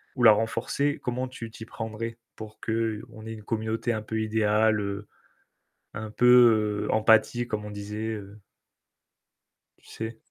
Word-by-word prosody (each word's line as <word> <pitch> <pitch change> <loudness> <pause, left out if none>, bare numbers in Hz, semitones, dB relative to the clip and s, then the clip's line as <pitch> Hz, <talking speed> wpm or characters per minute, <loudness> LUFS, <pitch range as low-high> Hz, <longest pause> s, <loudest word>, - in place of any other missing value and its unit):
ou 125 - -3
la 110 - +10
renforcer, 115 +6 0
comment 125 +1 -2
tu 115 -3 -8
t'y 110 0 -10
prendrais 115 +1 -6 0.2
pour 110 0 -10
qu'on 110 0 -3
ait 110 - -5
une 105 -1 -10
communauté 110 +2 -2
un 110 -2 -2
peu 110 0 -2
idéale, 110 0 +2
heu, 100 +1 -4 0.9
un 105 0 -5
peu, 115 -4 +5
heu, - - -1
empathique 110 +2 +3
comme 105 -1 -3
on 105 - -7
disait 105 +2 -5
heu? 105 0 -9 1.4
Tu - - -24
sais? 110 0 -6
110 Hz, 150 wpm, -27 LUFS, 105-115 Hz, 1.4 s, la